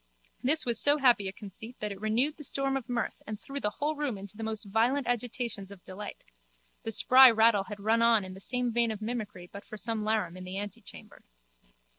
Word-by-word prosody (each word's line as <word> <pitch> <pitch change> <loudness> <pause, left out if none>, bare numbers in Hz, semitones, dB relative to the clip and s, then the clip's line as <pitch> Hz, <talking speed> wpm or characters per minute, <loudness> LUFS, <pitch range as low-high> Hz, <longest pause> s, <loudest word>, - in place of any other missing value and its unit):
This 300 +5 +4
was 235 -2 +1
so 290 +1 +6
happy 245 -8 +4
a - - -3
conceit 210 +5 -10
that 210 -1 -3
it 195 0 -8
renewed 240 +8 +1
the 300 - -9
storm 275 0 0
of 265 -2 -4
mirth 240 -1 -2
and 215 -1 -5
threw 275 +1 -6
the 210 - 0
whole 295 +8 -2
room 285 -7 -2
into 200 +1 -8
the 225 - -9
most 220 0 -3
violent 235 +7 +1
agitations 240 -4 -3
of 200 -3 -12
delight. 205 +2 -8 0.6
The - - -5
spry 255 +4 +8
rattle 220 -3 +4
had 210 -1 -8
run 220 +3 +2
on 230 -4 +4
in 185 - -8
the 190 - -11
same 250 +3 -2
vein 235 0 +3
of 215 -2 -4
mimicry 215 -6 -5
but 200 - -8
for 215 - -9
some 225 0 -2
larum 210 -5 0
in 185 - -8
the 185 +1 -6
antechamber. 205 +1 -9
220 Hz, 220 wpm, -29 LUFS, 205-245 Hz, 0.6 s, spry